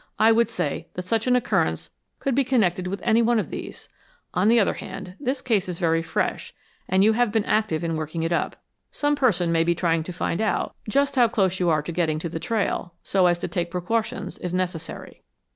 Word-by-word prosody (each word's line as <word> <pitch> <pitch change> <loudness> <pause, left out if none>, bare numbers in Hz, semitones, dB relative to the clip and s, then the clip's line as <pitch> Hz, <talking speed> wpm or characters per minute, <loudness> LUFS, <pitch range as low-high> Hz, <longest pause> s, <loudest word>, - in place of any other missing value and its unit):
I 220 +1 +5
would 230 +1 +3
say 145 - -3
that 180 - -4
such 225 +5 0
an 250 - +4
occurrence 245 -1 0 0.3
could 275 - -1
be 275 +3 +3
connected 190 -9 +1
with 195 +2 -4
any 230 0 +4
one 235 0 +3
of 205 -8 -2
these. - - -7 0.5
On 185 +3 +2
the 235 +1 +6
other 200 - +2
hand, 190 -2 -8
this 260 -1 -2
case 210 -7 +1
is 175 - -4
very 165 -1 +2
fresh, 165 - -2 0.3
and 190 +1 +4
you 220 +2 +5
have 240 -1 +2
been 220 -1 +1
active 215 -7 +1
in 165 -1 -1
working 155 +1 -3
it 165 - -1
up. 170 - 0 0.3
Some 290 0 0
person 185 - +2
may 165 0 +3
be 170 +1 +1
trying 165 -1 +1
to 180 - -5
find 175 +1 -2
out 220 - 0 0.2
just 280 +3 +1
how 245 -2 +6
close 190 -5 0
you 180 -1 +2
are 155 -2 +2
getting 165 -1 -1
to 165 +2 -4
the 165 - -4
trail, 180 -2 -2
so 190 -2 +3
as 175 -1 +3
to - - -4
take 175 -2 -2
precautions, 185 +6 -2
if 180 - -4
necessary." 180 -3 -4
185 Hz, 220 wpm, -24 LUFS, 170-230 Hz, 0.5 s, the